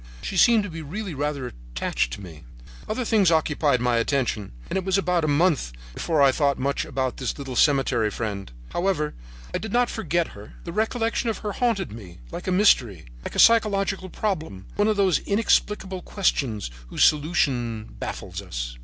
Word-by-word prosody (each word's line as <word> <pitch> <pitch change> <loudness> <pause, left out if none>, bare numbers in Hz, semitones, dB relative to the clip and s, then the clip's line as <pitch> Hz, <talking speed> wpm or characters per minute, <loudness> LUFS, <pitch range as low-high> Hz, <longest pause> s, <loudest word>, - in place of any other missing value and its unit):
She - - -4
seemed 225 +3 +5
to 205 - -5
be 165 0 -6
really 185 +5 -5
rather 145 -1 -2
attached - - -3
to - - -7
me. 80 -5 -11 0.5
"Other 235 +3 -1
things 210 -6 +4
occupied 150 -5 +2
my 125 -1 +2
attention, 115 -4 0 0.2
and - - -4
it 190 - 0
was 190 +1 +1
about 180 -2 +1
a - - +1
month 145 - +2 0.2
before 155 - +1
I 135 - +6
thought 140 +1 +1
much 140 +2 -1
about 130 -2 -2
this 130 - -3
little 135 -3 -6
cemetery 135 -6 +3
friend. 105 - -4 0.2
However, 175 -5 0 0.4
I - - 0
did 220 - -6
not 245 +1 +2
forget 175 -6 -1
her. 100 +1 -12
The 170 - -6
recollection 225 +2 0
of 220 - -2
her 210 - 0
haunted 225 -5 0
me 100 -6 -10
like - - -6
a - - +1
mystery, 125 - +3 0.2
like - - -6
a - - -3
psychological 195 -4 +4
problem, 160 - -3
one 205 - +2
of 215 -1 +1
those 190 -4 +3
inexplicable 200 -2 +1
questions 125 - -1 0.2
whose - - +1
solution 130 -8 +1
baffles - - -5
us. - - -5
155 Hz, 180 wpm, -24 LUFS, 120-195 Hz, 0.5 s, I